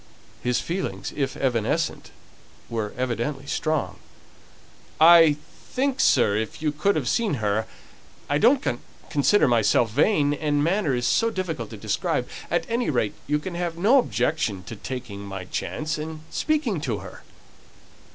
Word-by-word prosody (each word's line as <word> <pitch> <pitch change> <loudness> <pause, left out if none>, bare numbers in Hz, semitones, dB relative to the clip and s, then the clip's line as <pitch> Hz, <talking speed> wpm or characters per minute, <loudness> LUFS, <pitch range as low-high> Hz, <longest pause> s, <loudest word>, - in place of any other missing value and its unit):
His 125 0 +1
feelings, 185 +3 -4
if 140 -2 -2
evanescent, 120 -5 -1 0.6
were 110 -3 -2
evidently 130 +3 -2
strong. 155 +1 -2 1.0
"I 165 -2 +8 0.3
think, 270 0 -1
sir, 110 -6 +4
if 110 0 -4
you 155 -1 0
could 175 +7 +1
have - - -1
seen 225 -9 +1
her 110 -2 -1 0.6
I 145 0 +1
don't 255 - +4 0.4
consider 150 +7 +4
myself 115 -1 +3
vain, 145 - +3
and 145 -1 0
manner 170 -4 +1
is 120 0 -1
so 230 - +3
difficult 185 -7 -4
to - - -9
describe. - - -1 0.2
At - - 0
any 235 +1 0
rate, 120 -7 0
you 150 +1 +2
can 175 +5 -6
have 170 -1 -3
no 225 +10 +5
objection 120 - -1
to 90 - -8
my - - -18
taking 125 -6 -6
my 95 -2 -6
chance, 155 - -3
and 155 0 -6
speaking 285 - 0
to 120 -8 -2
her." 90 - -11
150 Hz, 150 wpm, -24 LUFS, 120-175 Hz, 1.0 s, I